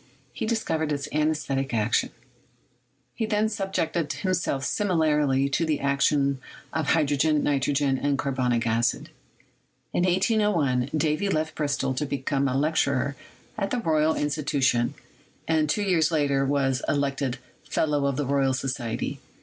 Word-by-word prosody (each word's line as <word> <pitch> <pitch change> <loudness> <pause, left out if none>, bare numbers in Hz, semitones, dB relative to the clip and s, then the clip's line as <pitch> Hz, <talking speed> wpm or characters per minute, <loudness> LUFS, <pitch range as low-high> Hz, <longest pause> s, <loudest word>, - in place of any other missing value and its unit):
He - - -3
discovered 160 -9 -1
its 145 -1 -2
anesthetic 150 -4 0
action. 110 +1 +1 1.0
He 220 - -2
then 215 0 +1
subjected 180 -6 -2
him 185 +7 -1
self 140 -6 -1
similarly 150 -8 +2
to 140 - 0
the 155 -3 0
action 140 0 +1 0.3
of 160 -2 -1
hydrogen, 150 0 +2
nitrogen, 140 -1 +1
and 140 -1 0
carbonic 125 -4 0
acid. 115 +1 0 0.8
In 175 - +1
1801, 180 - +2
Davy 155 +5 0
left 155 -3 -1
Bristol 145 -3 -1
to 145 +3 -2
become 140 0 -1
a 130 0 0
lecturer 140 -2 +1 0.4
at 195 - -1
the 250 - -1
Royal 160 -7 +2
Institution, 140 -5 0 0.5
and 155 -2 +2
two 210 - +1
years 180 -5 +2
later 140 -4 +1
was 135 -2 +1
elected 140 -2 0 0.3
Fellow 145 -2 +1
of 140 -2 -1
the 145 - -1
Royal 135 -1 +1
Society. 130 -3 -3
145 Hz, 135 wpm, -26 LUFS, 135-160 Hz, 1.0 s, similarly